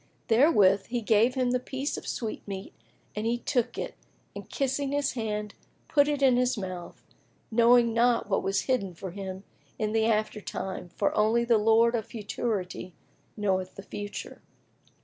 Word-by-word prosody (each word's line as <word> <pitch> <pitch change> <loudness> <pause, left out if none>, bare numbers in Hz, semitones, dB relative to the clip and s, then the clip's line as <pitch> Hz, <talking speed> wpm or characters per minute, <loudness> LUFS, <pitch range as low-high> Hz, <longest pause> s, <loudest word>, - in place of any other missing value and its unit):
Therewith 210 - +5
he 240 0 -2
gave 225 +4 +3
him 255 -2 +1
the 250 - +1
piece 265 +3 -3
of - - -7
sweetmeat 205 -4 -5 0.4
and 210 +1 -2
he 235 +1 +1
took 245 -1 -1
it - - -4 0.4
and - - -8
kissing 275 0 -1
his 285 -1 +1
hand, 210 -3 -3 0.3
put 285 -2 +4
it 290 -2 0
in 255 -2 +5
his 250 -1 +1
mouth, 185 -3 -7 0.5
knowing 235 0 +5
not 235 -1 +3
what 195 - +1
was 195 +1 0
hidden 200 -9 -1
for 185 +2 -7
him 190 0 -6 0.3
in 215 -1 -1
the 220 0 +2
after 215 -1 0
time 190 -2 -5
for 200 - +1
only 225 +3 +3
the 235 -2 +4
Lord 225 +2 +4
of 225 -2 -2
Futurity 205 -5 -4 0.4
knoweth 190 -3 -1
the 195 - -9
Future. 205 0 -7
225 Hz, 165 wpm, -28 LUFS, 200-245 Hz, 0.5 s, Therewith